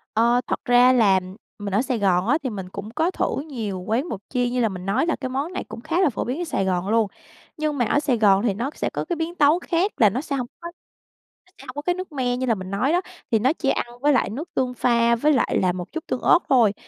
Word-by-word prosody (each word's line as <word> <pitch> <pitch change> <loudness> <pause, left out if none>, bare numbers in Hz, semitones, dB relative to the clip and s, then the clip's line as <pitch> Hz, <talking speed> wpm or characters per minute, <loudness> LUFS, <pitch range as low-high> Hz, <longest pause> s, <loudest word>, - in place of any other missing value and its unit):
Ờ, 235 +2 +3
thật - - -3
ra 245 0 +6
là 205 -6 +4 0.4
mình 205 -2 -5
ở 205 - +3
Sài 255 -3 -2
Gòn 190 -1 +2
á, 285 +5 +4
thì 260 - -1
mình 190 -5 -6
cũng 200 +3 -7
có 320 +7 0
thử 315 - -1
nhiều 220 -10 -4
quán 225 - -1
bột 210 - -4
chiên, 245 -2 0
như 250 - -1
là 225 - +2
mình 185 -2 -7
nói 210 +10 +1
là 335 - 0
cái 260 - -5
món 280 +7 -3
này - - -3
cũng - - -10
khá 325 +7 0
là 370 - +4
phổ 225 - -3
biến 260 +8 -3
ở - - 0
Sài 255 - -1
Gòn 185 0 -1
luôn. 225 -1 +3 0.5
Nhưng 305 -1 -1
mà 245 - +2
ở 255 - +2
Sài 280 -5 0
Gòn 200 -2 +4
thì 225 -4 +1
nó 235 +7 -3
sẽ - - -2
có - - -4
cái 345 - -2
biến 330 +1 -3
tấu 300 +1 +4
khác, 360 +3 0
là 215 - +6
nó 245 +7 -3
sẽ 285 -2 -3
hông 250 -3 -3
có 340 - -7 0.8
nó - - -26
sẽ 275 - -13
hổng 255 - -8
có 290 - -3
cái 355 +4 0
nước 370 -1 -7
me 250 -4 -1
như 260 - -1
là 230 -3 +2
mình 185 -1 -7
nói 210 +9 +1
đó, 355 - +3 0.3
thì 225 - +3
nó 260 +7 +2
chỉ 275 - -2
ăn - - 0 0.2
với 290 +1 +4
lại 255 - +2
nước 285 +11 -6
tương 255 -1 0
pha 235 -1 +2
với 300 +6 +2
lại 270 - +1
là 185 - +2
một 180 0 -6
chút 325 -1 -6
tương 255 - -2
ớt - - +5
thôi. 235 -6 +4
250 Hz, 290 wpm, -23 LUFS, 210-290 Hz, 0.8 s, ra